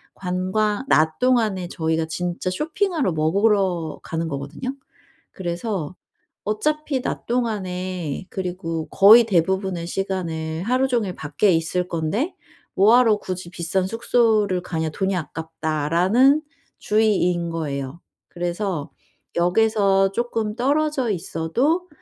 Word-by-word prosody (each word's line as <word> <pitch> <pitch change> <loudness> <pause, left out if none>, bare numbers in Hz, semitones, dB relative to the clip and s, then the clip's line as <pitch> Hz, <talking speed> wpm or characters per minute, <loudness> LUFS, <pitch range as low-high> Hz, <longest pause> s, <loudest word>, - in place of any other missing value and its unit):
관광 195 +5 -1
낮 155 0 +3
동안에 220 -8 +2
저희가 160 0 -1
진짜 175 +2 -3
쇼핑하러, 310 - -1
먹으러 180 0 +1
가는 165 0 -3
거거든요. 140 - -5 0.6
그래서 180 -1 -4 0.5
어차피 290 +5 -1
낮 - - -4
동안에 185 - -2
그리고 175 -3 -4
거의 215 +5 +8
대부분의 190 -2 0
시간을 170 -4 -3
하루 255 +4 +2
종일 220 -8 -1
밖에 155 +7 +1
있을 175 +2 0
건데 180 - -2 0.4
"뭐 210 +5 +6
하러 225 -4 +4
굳이 185 -3 -6
비싼 180 +2 -1
숙소를 215 -4 +2
가냐? 160 -3 -2
돈이 190 +4 -1
아깝다."라는 165 - +1 0.4
주의인 185 -6 +1
거예요. 140 -2 -4 0.3
그래서 175 -2 -3 0.5
역에서 195 +1 +3
쪼끔 225 -2 -2
떨어져 280 0 +1
있어도 235 - -1
185 Hz, 260 characters per minute, -22 LUFS, 165-220 Hz, 0.6 s, 거의